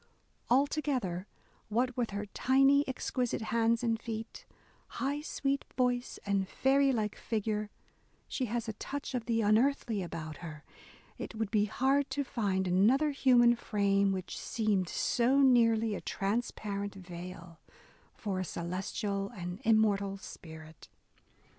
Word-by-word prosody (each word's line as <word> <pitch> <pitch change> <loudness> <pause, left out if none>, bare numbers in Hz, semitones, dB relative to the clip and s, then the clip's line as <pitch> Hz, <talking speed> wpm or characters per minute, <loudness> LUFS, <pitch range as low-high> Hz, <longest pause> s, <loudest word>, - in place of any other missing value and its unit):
Altogether, 255 - +1 0.4
what 245 +3 +1
with 240 -2 -1
her 205 +1 -4
tiny, 270 +6 +4
exquisite 250 -3 -2
hands 230 +1 +2
and 225 -1 0
feet, 225 -1 -6 0.5
high 285 +2 -1
sweet 275 -2 -1
voice, 250 -1 0
and 200 -1 +1
fairy 275 +1 +3
like 215 -4 -1
figure, 215 -1 -2 0.6
she 260 - -2
has 235 0 -3
a 220 - -3
touch 285 +6 -5
of 245 -2 -3
the 230 -1 +2
unearthly 225 0 +2
about 160 -3 -6
her; 155 -3 -9 0.6
it - - -6
would 220 -2 -2
be 210 -1 +3
hard 270 +6 +1
to 285 +2 -1
find 195 -7 -1
another 235 +12 +4
human 245 -4 +5
frame 200 -3 +1
which 185 -1 -4
"seemed 205 -5 0
so 255 +3 +2
nearly 230 -4 +4
a - - -4
transparent 205 -1 -2
veil 175 -2 -9 0.6
for 195 -4 -3
a - - 0
celestial 195 +4 -3
and 180 +2 -6
immortal 205 -3 +3
spirit." 160 -5 -11
220 Hz, 130 wpm, -31 LUFS, 195-250 Hz, 0.6 s, human